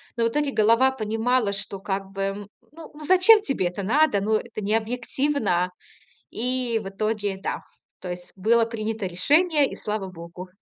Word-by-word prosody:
Но 230 - 0
вот 230 +5 0
эти 290 -2 +1
голова 230 +4 +4
понимала, 225 -1 0
что 195 0 -5
как 195 -1 -3
бы: 195 +1 -3 0.2
ну 320 +1 -12
ну, 300 0 -10
зачем 375 +5 +6
тебе 270 - -1
это 185 +3 -5
надо? 250 -2 +3
Ну, 215 +2 +1
это 215 -1 -4
необъективно. 225 -2 0 0.6
И 250 -1 -1
в - - -6
итоге, 205 0 -2
да, - - -2 0.4
то 180 - -7
есть 175 0 -7
было 230 +4 +3
принято 220 -2 -4
решение, 290 - +3
и - - -7
слава 210 -2 -3
богу. 175 +1 -10
220 Hz, 165 wpm, -24 LUFS, 195-255 Hz, 0.6 s, зачем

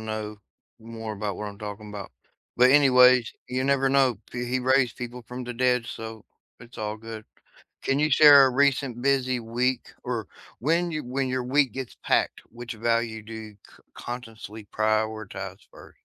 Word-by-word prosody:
know 110 -1 -5 0.4
more 115 -1 -7
about 100 -2 -4
what 105 - -5
I'm 100 0 -11
talking 105 0 -7
'bout, 100 -2 -7 0.5
but 125 +1 +6
anyways, 125 -3 +6
you 130 +1 -2
never 135 0 +2
know 135 -3 +3
p 120 0 -4
He 130 +1 0
raised 130 -1 +2
people 125 0 -7
from 125 +2 -7
the 125 - -5
dead, 125 0 +1
so 110 -1 -8 0.4
it's 115 0 -14
all 105 0 -3
good. 110 -1 -9 0.6
Can 135 +1 +1
you 150 0 +2
share 145 -1 +8
a 130 - +3
recent 135 -2 +1
busy 130 -2 +1
week 120 +3 -2
or 120 -5 -3 0.3
when 170 +6 +1
you 155 -1 -3
when 130 +2 -2
your 130 -1 -1
week 135 +1 +2
gets 130 -2 -7
packed, - - +1
which 120 0 -8
value 115 0 -1
do 110 +2 -10
you 110 -1 -8 0.2
c - - -20
consciously 115 -3 -8
prioritize 110 -1 -2
1st? - - -16
120 Hz, 170 wpm, -26 LUFS, 110-130 Hz, 0.6 s, share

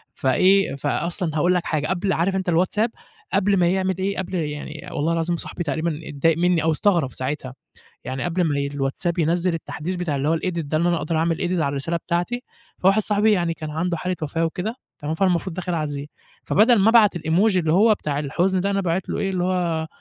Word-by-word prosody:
فإيه، 185 +7 +3
فأصلًا 160 +4 -2
هاقول 175 +4 +3
لك 180 -1 0
حاجة 155 -2 -1
قبل 190 +1 0
عارف 190 +4 0
أنت 190 -2 -1
الWhatsApp؟ 195 +7 +2 0.4
قبل 200 0 +3
ما 175 -1 +3
يعمِل 190 0 0
إيه، 195 +1 -2
قبل 190 0 -3
يعني 150 -1 -4
والله 160 +3 0
العظيم 165 +1 0
صاحبي 175 - -4
تقريبًا 160 +1 -2
اتضايق 155 +3 +1
مِّني 175 -2 +2
أو 160 - +3
استغرب 165 -5 +1
ساعتها، 130 -1 -4 0.5
يعني 130 0 -4
قبل 175 0 0
ما 145 -3 0
ي 140 0 -1
الWhatsApp 145 +5 -2
ينزّل 170 +2 +1
التحديث 165 +2 -4
بتاع 165 -5 -2
اللي 140 +2 -1
هو 165 - +3
الedit - - -8 0.2
ده، 155 0 -2
إن 170 - +1
أنا 175 -1 +2
أقدر 160 +1 -2
أعمل 165 0 +1
edit 180 -2 -1
على 140 - +1
الرسالة 140 +5 -2
بتاعتي، 175 +9 -2 0.4
فواحد 195 +3 +3
صاحبي 210 +1 +3
يعني 170 -4 +1
كان 155 -2 -6
عنده 170 +3 -1
حالة 180 +2 -2
وفاة 165 +2 -1
وكده، 195 +8 -3 0.2
تمام، 150 +1 -3
فأنا 185 +3 +2
المفروض 175 0 -1
داخل 180 -1 -3
أعزيه، 145 -2 -3 0.4
فبَدَل 225 +3 +5
ما 205 +3 +4
أبعت 210 -6 +5
الemoji 185 +6 +2
اللي 160 -3 +2
هو 215 +4 +5
بتاع 145 -6 -3
الحزن 180 +6 0
ده، 200 +2 0
أنا 195 0 +1
باعِت 180 0 -1
له - - -2
إيه، 195 - 0
اللي 180 -1 -1
هو 170 -3 0
170 Hz, 215 wpm, -22 LUFS, 155-185 Hz, 0.5 s, فبَدَل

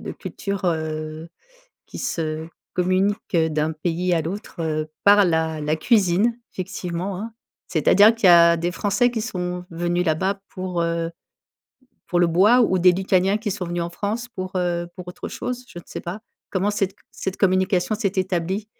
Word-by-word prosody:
de - - -6
culture, 200 -1 -5
heu, 155 -1 -2 0.6
qui - - -9
se 160 -1 -3 0.3
communique 185 +2 0
d'un 160 -1 +1
pays 175 +3 -1
à 165 - +1
l'autre, 190 +2 -6
heu, 155 -1 -2
par 205 0 +7
la 160 -2 0
la 150 +1 0
cuisine, 205 +4 +2
effectivement, 185 0 -4
hein. 225 +2 -6 0.4
C'est-à-dire 200 +7 +5
qu'il 230 -3 +1
y - - +8
a 170 0 +7
des 170 +1 -1
Français 205 +6 +1
qui 230 - -3
sont 180 -5 -4
venus 175 +1 -1
là-bas 190 +6 +1
pour, 185 -2 -3
heu, 170 0 -1 1.0
pour 175 - +1
le 175 - +4
bois 205 +9 +5
ou 185 -5 +3
des 180 0 +6
Lituaniens 190 +2 +2
qui 215 -1 -3
sont 190 -1 -3
venus 175 0 -2
en 170 - -3
France 215 +7 -3
pour, 185 0 -4
heu, 175 -1 0
pour 180 -2 -9
autre 180 - -7
chose? 250 0 -5
Je 175 - -9
ne - - -14
sais - - -6
pas. 180 +4 -5 0.3
Comment 195 +1 +1
cette 195 -2 -1 0.2
cette 190 0 -4
communication 185 +1 +2
s'est 205 -3 -1
établie? 185 +1 -1
180 Hz, 175 wpm, -23 LUFS, 170-200 Hz, 1.0 s, y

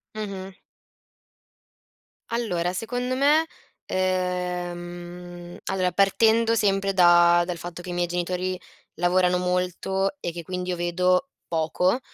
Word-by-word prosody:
Mh-mh. 195 -3 -5 1.8
Allora 180 -7 -1
secondo 245 +5 -2
me, 295 +4 +4 0.4
ehm, 175 -1 -3
allora 185 -1 0
partendo 225 +4 +3
sempre 195 -2 +1
da 175 -1 +6
dal 175 -1 -4
fatto 175 +1 -7
che 180 - -9
i - - -3
miei 175 0 0
genitori 180 +1 -2 0.4
lavorano 180 +1 +2
molto 180 +4 -1
e 175 - -3
che 170 0 -7
quindi 180 +1 -4
io 180 - 0
vedo 180 +7 +1 0.2
poco, 175 +7 +1
180 Hz, 115 wpm, -25 LUFS, 175-195 Hz, 1.8 s, da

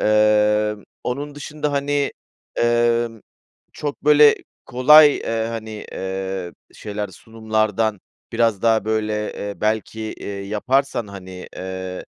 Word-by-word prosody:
Emm, 105 0 +3 0.2
onun 145 +4 -3
dışında, 150 0 -4
hani, 140 0 0 0.4
emm, 120 -1 +1 0.5
çok, 145 -1 -5
böyle, 150 -1 +7 0.3
kolay, 145 +4 +7
eee, 115 -1 -2
hani, 110 -2 -6
eee, 95 -1 -4 0.2
şeyler, 105 0 -5
sunumlardan 110 0 -1 0.3
biraz 115 -4 +1
daha, 110 -2 +3
böyle, 110 -1 -1
eee, 100 0 -5
belki, 110 +1 -1
eee, 110 - -6 0.2
yaparsan, 125 +3 0
hani, 95 -2 -9
eee, 95 0 -6
110 Hz, 110 wpm, -21 LUFS, 105-125 Hz, 0.5 s, böyle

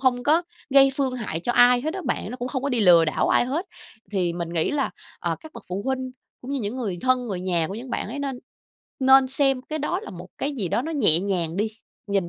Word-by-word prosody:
hông 250 -2 +2
có 315 +6 +3 0.3
gây 275 0 +6
phương 265 -2 0
hại 205 -9 -3
cho 240 - -1
ai 245 0 +6
hết 315 +6 -3
á 385 - -4
bạn, - - -2
nó 250 - -5
cũng 250 0 -4
không 260 -1 -3
có 280 - 0
đi 245 -3 +2
lừa 175 -5 +7
đảo 155 - 0
ai - - +4
hết. 300 +9 -2 0.4
Thì 180 -4 0
mình 170 -1 -4
nghĩ 165 -2 0
là, 285 -2 0 0.3
à, - - -2
các 315 -1 -12
bậc - - -10
phụ 190 +2 -3
huynh 260 -1 -2 0.3
cũng 255 - -8
như 275 - -1
những 215 +4 -3
người 200 -8 -3
thân, 255 -1 +1
người 190 -4 -3
nhà 175 -3 0
của 195 - -5
những 240 +3 -7
bạn - - -2
ấy 265 +6 -5
nên 275 -3 -3 0.6
nên 265 0 +6
xem 270 -1 +1
cái 310 +2 -4
đó 300 +5 -1
là - - -9
một 180 +1 -10
cái 285 - -1
gì 200 -9 -2
đó 235 - 0
nó 325 +2 -4
nhẹ 205 - +4
nhàng 180 -4 -2
đi, 215 +2 +1 0.4
nhìn 195 -3 0
245 Hz, 265 wpm, -24 LUFS, 190-270 Hz, 0.6 s, lừa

